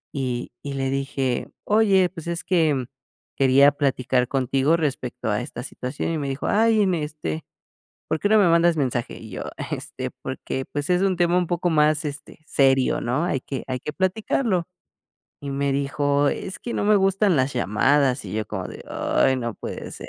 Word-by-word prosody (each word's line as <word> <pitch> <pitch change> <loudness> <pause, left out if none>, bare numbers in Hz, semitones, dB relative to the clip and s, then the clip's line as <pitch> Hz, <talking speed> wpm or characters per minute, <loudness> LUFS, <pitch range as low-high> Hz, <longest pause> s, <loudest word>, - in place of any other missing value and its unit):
Y 125 -3 -2
y 140 -1 -4
le 135 -1 -1
dije: 135 -2 -1 0.2
"Oye, 205 -3 +4
pues, 170 -3 -9
es 170 +2 -2
que, 165 -5 +2
mm, 130 -2 -2 0.5
quería 135 +1 +6
platicar 130 -3 0
contigo 135 +4 +1
respecto 135 -6 -3
a 105 - 0
esta 120 - -7
situación", 135 +4 -4
y 160 - -1
me 140 -2 -3
dijo: 135 - -4
"Ay, 220 0 +3
en 185 -2 +2
este, 150 - -3 0.7
¿por 160 - 0
qué 205 - +1
no 220 - +6
me 195 - +5
mandas 170 0 +4
mensaje?". 125 -4 -1
Y 110 -3 -11
yo: - - -5 0.3
"este, - - -4
porque, 130 - -4
pues 145 +2 -3
es 180 0 +3
un 190 -2 +1
tema 175 0 +3
un 180 - +2
poco 175 +1 0
más, 155 -1 +3
este, 145 +1 -7
serio, 135 -2 +3
¿no? 130 +7 0
Hay 140 -7 -1
que 135 - -5
hay 130 -1 -3
que 150 - -4
platicarlo". 190 - 0 0.8
Y 140 - -4
me 140 0 0
dijo: 140 +1 +1
"Es 190 - -5
que 240 - -5
no - - -1
me 210 0 +5
gustan 195 -2 +3
las 130 +1 +1
llamadas". 130 +4 +2
Y 95 - -7
yo 110 0 -2
como 95 -3 -4
de, - - -9
ay 130 - +1
no 120 -3 -3
puede - - -7
ser. - - -8
145 Hz, 195 wpm, -23 LUFS, 130-175 Hz, 0.8 s, quería